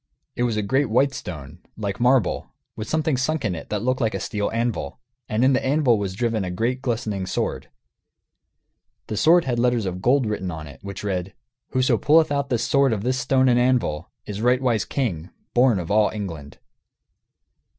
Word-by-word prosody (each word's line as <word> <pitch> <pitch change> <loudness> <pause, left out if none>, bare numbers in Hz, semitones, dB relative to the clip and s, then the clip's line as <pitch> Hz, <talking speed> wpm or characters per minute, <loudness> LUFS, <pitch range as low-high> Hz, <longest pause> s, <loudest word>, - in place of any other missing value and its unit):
It - - -3
was 120 -3 +1
a 105 - 0
great 130 +6 +1
white 135 +5 +2
stone, 75 - -8 0.2
like 100 -3 -3
marble, 125 -3 +2 0.3
with 110 - -6
something 155 -3 +1
sunk 140 +1 -1
in 95 - 0
it 80 - -8
that 105 0 -2
looked 130 +2 0
like 110 -2 0
a - - -2
steel 105 -2 -2
anvil; 115 +1 -2 0.3
and 110 +4 +2
in 135 - +4
the 130 - +1
anvil 130 -5 +3
was 95 -2 -3
driven 115 -2 0
a 90 - -3
great 115 +8 -1
glistening 110 -7 -2
sword. 90 - -3 1.4
The 110 - -4
sword 165 - +5
had 120 -3 -1
letters 120 -3 +2
of 90 -1 -4
gold 130 +3 +3
written 105 -4 -2
on 80 -3 -6
it, 70 -4 -12
which 100 0 -7
read: 95 -2 -3 0.3
"Whoso 130 -3 +2
pulleth 155 +6 +4
out 140 -1 -1
this 120 -2 0
sword 140 -3 +3
of 105 -2 -3
this 130 +2 0
stone 130 -1 +2
and 125 -1 +4
anvil 120 -11 +1 0.2
is 105 0 -5
rightwise 125 -2 +2
king 90 - -2 0.2
born 125 -3 +4
of 85 -1 -4
all 105 0 +4
England." 80 -9 -7
115 Hz, 190 wpm, -23 LUFS, 100-130 Hz, 1.4 s, sword